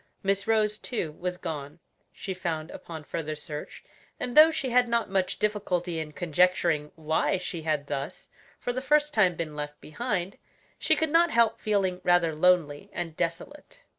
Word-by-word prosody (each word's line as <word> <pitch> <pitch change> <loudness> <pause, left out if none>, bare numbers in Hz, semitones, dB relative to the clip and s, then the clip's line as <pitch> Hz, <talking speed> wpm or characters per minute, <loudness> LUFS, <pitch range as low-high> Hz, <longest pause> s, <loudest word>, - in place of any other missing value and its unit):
Miss 195 +1 0
Rose, 215 -1 +2
too, 190 -11 -3
was 180 +3 -4
gone, 150 -4 -6 0.3
she 190 - -5
found 165 -3 -3
upon 160 -2 -8
further 155 0 -4
search, 150 0 -8 0.4
and 245 -1 -4
though 310 +1 +10
she 280 -5 -2
had 245 0 +4
not 235 -3 0
much 190 -1 0
difficulty 180 -5 -1
in 155 -1 -5
conjecturing 170 -2 +2
why 160 +3 +1
she 180 -2 -5
had 155 -2 -1
thus, 145 +4 -5 0.3
for 245 - -2
the 255 - -2
first 300 +2 +2
time, 185 -5 +4
been 155 -2 -4
left 150 0 -5
behind, 195 +1 -3 0.4
she - - +3
could 320 -2 0
not 340 +2 +5
help 230 -5 +3
feeling 195 -4 0
rather 175 -2 +3
lonely 155 -3 +2
and 165 -3 -5
desolate. 280 - -5
180 Hz, 165 wpm, -27 LUFS, 155-220 Hz, 0.4 s, though